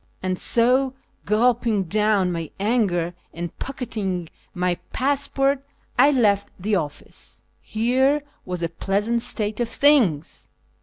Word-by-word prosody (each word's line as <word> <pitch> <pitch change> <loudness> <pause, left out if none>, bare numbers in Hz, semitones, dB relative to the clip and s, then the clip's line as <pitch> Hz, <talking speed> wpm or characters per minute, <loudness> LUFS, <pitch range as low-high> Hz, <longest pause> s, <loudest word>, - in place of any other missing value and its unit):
And 185 -1 -1
so, 255 +3 +3 0.3
gulping 225 0 +2
down 205 0 +2
my 165 -3 -4
anger 195 -6 +1 0.2
and 170 0 -5
pocketing 200 - -4 0.2
my 180 -1 -1
passport, 275 0 +1 0.4
I 275 +3 +7
left 210 -8 +2
the 210 +4 -2
office. 155 -7 -4 0.2
Here 260 +6 +1 0.2
was 180 -2 -4
a 165 - 0
pleasant 205 +7 0
state 215 -1 -1
of 240 -1 0
things 230 - +2
215 Hz, 115 wpm, -23 LUFS, 180-250 Hz, 0.4 s, I